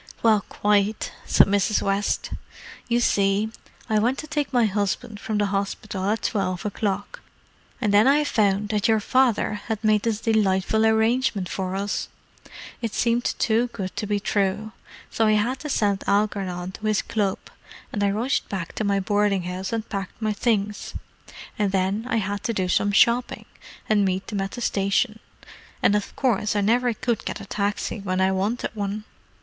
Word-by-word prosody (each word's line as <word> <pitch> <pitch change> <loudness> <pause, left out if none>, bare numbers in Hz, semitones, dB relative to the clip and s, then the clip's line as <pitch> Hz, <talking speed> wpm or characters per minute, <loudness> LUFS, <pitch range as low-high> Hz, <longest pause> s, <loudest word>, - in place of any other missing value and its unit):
"Well, 220 -3 +5
quite," 210 +1 +1 0.2
said - - +6
Mrs. 205 +1 +1
West. 195 +1 0 0.6
"You 240 0 +2
see, 200 -1 +2 0.4
I 215 -1 +2
went 245 +5 +1
to 310 - -6
take 295 -2 -2
my 245 -3 +3
husband 205 +1 -2
from 215 0 -2
the 205 - +2
hospital 200 0 -3
at 220 +2 -1
twelve 185 -4 -1
o'clock, 205 -1 -3 0.6
and 210 -4 +1
then 210 +4 +6
I 290 +2 +5
found 205 -6 +1
that 210 +1 +1
your 220 -1 +4
father 225 -2 +1
had 220 -1 -3
made 215 -1 +3
this 220 -2 -1
delightful 220 -1 +2
arrangement 220 -3 +2
for 190 -1 -3
us. 200 +1 -2 0.7
It 225 -3 -3
seemed 240 0 +1
too 230 +2 +2
good 190 -5 -6
to 210 - -2
be 205 0 0
true. 205 +1 -1 0.4
So 225 - +2
I 215 - +4
had 235 +5 +1
to 300 - -6
send 205 -6 +1
Algernon 195 -3 0
to 215 +3 -5
his 215 -1 +1
club, 205 -4 0 0.6
and 205 - -1
I 200 - +3
rushed 230 +7 -1
back 185 -4 -4
to - - -3
my 200 -1 +2
boarding 205 -1 +1
house 180 +3 -4
and 225 -1 -2
packed 195 -2 -5
my 215 -1 0
things: 210 -2 -1 0.6
and 205 -2 +2
then 195 +4 0
I 230 - +1
had 205 -1 -2
to 230 - -1
do 185 -2 0
some 205 +3 +2
shopping, 235 +4 +3 0.4
and 210 -2 +3
meet 190 0 0
them 205 -3 -3
at 195 - -2
the 245 - -6
station. 205 +2 +1 0.6
And - - +5
of 210 - -2
course 215 -5 +1
I 205 - +2
never 240 +4 +2
could 235 0 -1
get - - -4
a 200 - -8
taxi 200 +2 -2
when 185 -2 -2
I 190 0 +3
wanted 200 +6 -1
one. 205 0 -3
210 Hz, 180 wpm, -24 LUFS, 195-225 Hz, 0.7 s, said